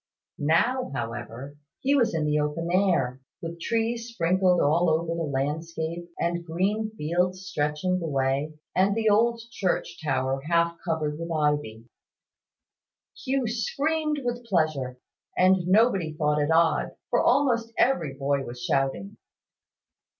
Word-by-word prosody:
Now, 235 - +2
however, 120 +4 -6 0.2
he 275 +2 +2
was 235 -9 +2
in 155 -2 0
the 150 0 +2
open 150 +3 -2
air, 170 -10 +1 0.2
with 170 0 -7
trees 230 +2 -1
sprinkled 185 -4 +2
all 165 +4 +3
over 160 +1 +1
the 165 -3 -2
landscape, 160 +4 -3
and 170 0 -1
green 195 +6 -1
fields 180 +4 -1
stretching 180 +2 -1
away, 140 0 -1 0.2
and 195 +2 +3
the 225 -1 0
old 230 +3 +3
church 185 -5 -2
tower 135 -2 0
half 170 0 +2
covered 155 -3 -2
with 165 0 -5
ivy. 150 -8 -1 1.3
Hugh 265 -1 -1
screamed 300 +7 -1
with 245 0 -2
pleasure; 155 - 0 0.4
and 185 -1 +4
nobody 195 -5 +3
thought 150 -1 +1
it 145 - 0
odd, 165 0 +2 0.2
for - - +3
almost 235 -5 +2
every 170 - +2
boy 140 0 0
was 120 -1 -8
shouting. 140 +10 -1
170 Hz, 130 wpm, -26 LUFS, 150-200 Hz, 1.3 s, and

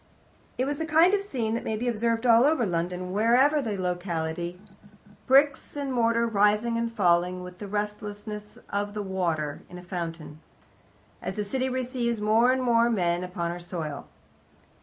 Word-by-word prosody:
It 255 - +1
was 285 +1 -2
the 320 - -2
kind 330 +4 +5
of 405 - +3
scene 245 - -2
that 230 - -2
may 220 - -2
be 245 +3 -3
observed 230 0 0
all 230 0 +6
over 290 -4 +3
London, 180 0 -2
whatever 250 +8 +4
the 215 -6 -3
locality 175 -1 -3 0.7
bricks 275 +2 +3
and 280 -2 -2
mortar 230 -1 +2
rising 210 +1 +2
and 230 0 -1
falling 180 -3 +2
with 180 0 -10
the 205 - -6
restlessness 210 0 -5
of 205 +1 -2
the 210 - -2
water 170 -6 -2
in 180 - -9
a 180 - -10
fountain, 165 -4 -6 0.8
as - - -4
the 210 -1 -2
city 260 +5 -1
receives 250 -2 -2
more 220 +4 +4
and 260 0 0
more 235 -1 +3
men 175 -5 0
upon 175 -2 -3
her 175 - -6
soil. 165 -5 -6
210 Hz, 170 wpm, -27 LUFS, 180-240 Hz, 0.8 s, all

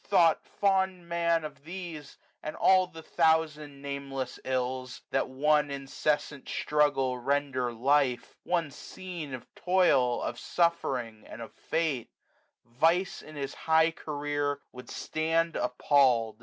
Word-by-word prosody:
Thought 170 -5 +3
fond 190 -3 +1
Man 170 -1 +1
Of 150 -2 -9
these, 165 -3 -8 0.2
and 155 - -5
all 185 -1 +5
the 165 -3 -11
thousand 155 -4 +1
nameless 135 -2 -4
ills. 130 0 -3
That - - +1
one 150 +2 +2
incessant 140 +1 -2
struggle 135 -4 +1
render 135 -1 0
life, 130 +1 +2 0.2
350 - - -19
One 170 -4 +1
scene 170 -3 -8
of 125 - -13
toil, 155 -10 +3
of 120 - -3
suffering 130 -11 -1
and - - -9
of 115 -2 -8
fate; 155 -7 -2 0.6
Vice 165 +10 +1
in 155 - -12
his 140 -1 -4
high 160 0 +3
career 145 -2 -2
would 125 -1 -11 0.3
(land 165 +1 +1
appall'd. 125 -3 +2
145 Hz, 130 wpm, -29 LUFS, 130-165 Hz, 0.6 s, all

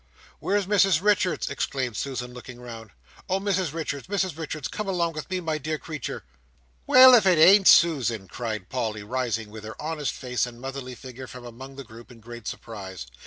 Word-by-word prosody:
"Where's 200 0 0
Mrs 195 -4 +4
Richards?" 195 -2 +1
exclaimed 130 -4 -2
Susan 125 +1 -4
Nipper, - - -13
looking 125 0 -10
round. 115 -3 -9 0.4
"Oh 190 +1 +1
Mrs 190 -5 0
Richards, 150 -3 -4
Mrs 190 -4 -1
Richards, 155 -3 -5
come 210 - -5
along 170 -3 0
with 155 -1 -7
me, 185 0 -1
my 160 -2 -2
dear 155 +2 -3
creetur!" 155 -4 -6 0.6
"Why, 255 0 +9
if 210 -5 +4
it 180 -3 +5
ain't 190 +5 +7
Susan!" 120 - +4
cried 110 -4 -5
Polly, 110 -5 -3
rising 115 -2 -2
with 110 0 -9
her 110 +1 -9
honest 150 -2 -3
face 125 -1 -2
and 120 -1 -11
motherly 135 -1 -6
figure 130 0 -10
from 125 0 -10
among 130 +3 -10
the 140 - -8
group, 115 0 -14
in 120 - -14
great 120 0 -10
surprise. 95 - -7
135 Hz, 190 wpm, -25 LUFS, 120-170 Hz, 0.6 s, Why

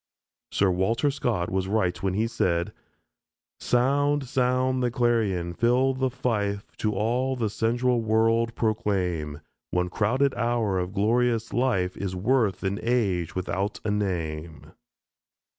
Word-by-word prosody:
Sir 95 -2 +2
Walter 115 +10 +1
Scott 115 -10 -1
was 95 0 -1
right 95 -4 0
when 95 -1 -1
he 110 +2 +1
said: 85 -7 0 0.9
"Sound, 140 +3 +1
sound 130 0 +1
the 125 - +2
clarion, 115 -8 0
fill 125 +6 +2
the 130 0 0
fife, 105 -6 -2
To 105 -2 -1
all 125 +6 0
the 115 -5 -1
sensual 120 +2 +1
world 115 +1 +2
proclaim: 90 -9 -1 0.3
One 90 0 0
crowded 130 +8 +1
hour 115 -5 0
of 90 +1 -3
glorious 115 +2 +1
life 105 -8 +1
Is 95 -2 -4
worth 105 +1 +1
an 100 +2 -1
age 100 -9 0
without 95 +3 -2
a 105 - +1
name." 85 -6 -3
110 Hz, 130 wpm, -26 LUFS, 95-125 Hz, 0.9 s, Sir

